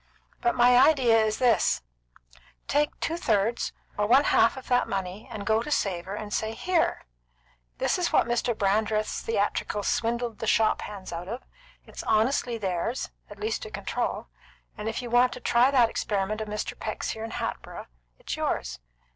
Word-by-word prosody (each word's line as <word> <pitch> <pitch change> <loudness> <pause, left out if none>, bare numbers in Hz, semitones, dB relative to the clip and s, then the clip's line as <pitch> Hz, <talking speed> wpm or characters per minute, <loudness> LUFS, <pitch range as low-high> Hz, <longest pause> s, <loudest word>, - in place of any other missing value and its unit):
"But 360 - +2
my 245 0 +6
idea 260 -5 +5
is 215 0 0
this: 245 - +2 0.8
Take 295 +1 +1
two 330 - -1
thirds 225 - +1 0.3
or 210 - +2
one 260 +5 +6
half 280 - +3
of 265 - -9
that 245 -1 +2
money, 195 +1 -4
and 200 -1 -6
go 220 +1 +2
to 270 - -6
Savor, 190 -7 -1
and 210 0 -6
say: 220 +1 -1
'Here! 350 +5 0 0.7
This - - +1
is 355 - 0
what - - +4
Mr. 240 -1 0
Brandreth's 215 +1 0
theatricals 205 -1 -1
swindled 235 -1 -1
the 225 - -3
shop 220 0 +3
hands 195 -4 -7
out 170 +2 -5
of. 235 +6 -5 0.4
It's - - -8
honestly 235 +2 +1
theirs, 195 +4 -2 0.2
at - - -11
least 435 +3 -2
to 445 - -6
control; - - -3 0.5
and 210 +1 -4
if 225 - -4
you 240 - -6
want 245 +1 +4
to - - -8
try 245 +1 +4
that 250 -4 +4
experiment 210 +1 -1
of 215 - -4
Mr. 210 0 -3
Peck's 215 - -3
here 220 - -6
in 225 - -4
Hatboro', - - -5 0.3
it's - - -5
yours. - - -2
225 Hz, 175 wpm, -27 LUFS, 210-250 Hz, 0.8 s, my